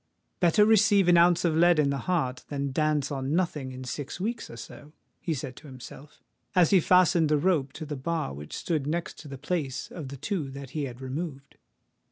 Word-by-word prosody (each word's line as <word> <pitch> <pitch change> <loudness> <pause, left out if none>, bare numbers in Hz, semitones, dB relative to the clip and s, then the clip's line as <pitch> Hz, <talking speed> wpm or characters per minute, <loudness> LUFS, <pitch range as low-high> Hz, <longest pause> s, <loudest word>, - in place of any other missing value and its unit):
"Better 185 +4 +5
receive 210 -3 +4
an 175 - +6
ounce 175 +1 +4
of 165 -2 +2
lead 175 +1 +5
in 145 -2 +3
the 140 - -2
heart 130 -8 0
than 140 -1 -3
dance 150 0 0
on 135 +2 -2
nothing 150 -7 -1
in 130 0 -8
six 140 +5 -5
weeks 225 +4 -3
or 115 - -10
so," 145 +5 -11 0.3
he 165 - -2
said 130 -2 -6
to 150 - -12
himself, 130 +2 -12 0.3
as 180 -3 +5
he 195 - +6
fastened 175 -2 +4
the 150 - +3
rope 145 -4 +1
to 155 - -7
the 150 0 -5
bar 155 - -2
which 75 +2 -8
stood 155 -5 -2
next 170 +3 -3
to 155 - -10
the 135 -1 -7
place 145 -2 -3
of 160 -6 -7
the 140 +1 -8
two 150 0 -3
that 135 -1 -9
he 150 -1 -2
had 125 -1 -8
removed. 140 +1 -6
150 Hz, 215 wpm, -27 LUFS, 135-175 Hz, 0.3 s, an